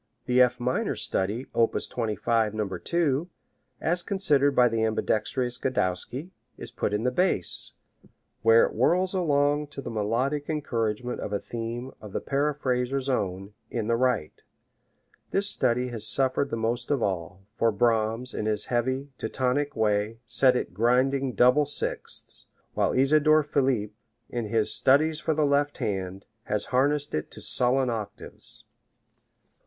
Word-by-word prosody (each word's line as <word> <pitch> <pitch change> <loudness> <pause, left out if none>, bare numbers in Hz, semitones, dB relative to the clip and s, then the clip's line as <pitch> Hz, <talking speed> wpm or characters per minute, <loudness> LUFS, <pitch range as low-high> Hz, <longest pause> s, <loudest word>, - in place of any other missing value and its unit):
The 125 0 +3
F 125 -1 +3
minor 125 +1 -1
study, 105 +7 -1
op. 115 -1 +2
25, 110 -1 -1
No. 105 -2 -1
2, 150 - -1 0.5
as 175 +2 0
considered 145 -9 +1
by 125 -1 +6
the 115 -1 0
ambidextrous 120 +3 -1
Godowsky, 130 - -2 0.3
is - - -8
put - - -2
in 105 +1 -1
the 125 - +1
bass, 155 - +1 0.7
where 115 +1 +6
it - - -5
whirrs 185 +2 +2
along 145 -4 +1
to 140 - -9
the 125 - -5
melodic 125 +8 -1
encouragement 125 -6 -2
of - - -5
a 100 - -1
theme 120 +2 -5
of 105 -2 -10
the - - -1
paraphraser's 135 -2 -1
own, 95 -4 -2 0.2
in 115 -3 -3
the 115 +1 +1
right. 120 -10 -1 0.9
This 200 +1 +1
study 125 -8 +1
has 115 -3 -3
suffered 135 +1 +1
the 115 - -3
most 120 +2 -1
of 140 -5 +1
all, 95 0 -3
for 115 0 +2
Brahms, 115 +2 0
in 110 - -3
his 105 -1 0
heavy, 130 +4 -1
Teutonic 130 +5 -1
way, 105 0 0
set 130 +1 +3
it 125 - -2
grinding 130 +5 +2
double 125 +7 +4
sixths, 145 - -4 0.3
while - - +1
Isidor 155 +3 +4
Philipp, 130 -8 0 0.4
in 120 -2 -3
his 110 0 0
"Studies 155 +3 +3
for 155 0 -1
the 155 -1 +2
Left 145 0 +1
Hand," 95 -1 -3 0.2
has 105 -1 -1
harnessed 145 +3 +1
it 75 - -2
to - - -11
sullen 125 0 +3
octaves. 110 -3 -8
125 Hz, 150 wpm, -26 LUFS, 110-140 Hz, 0.9 s, by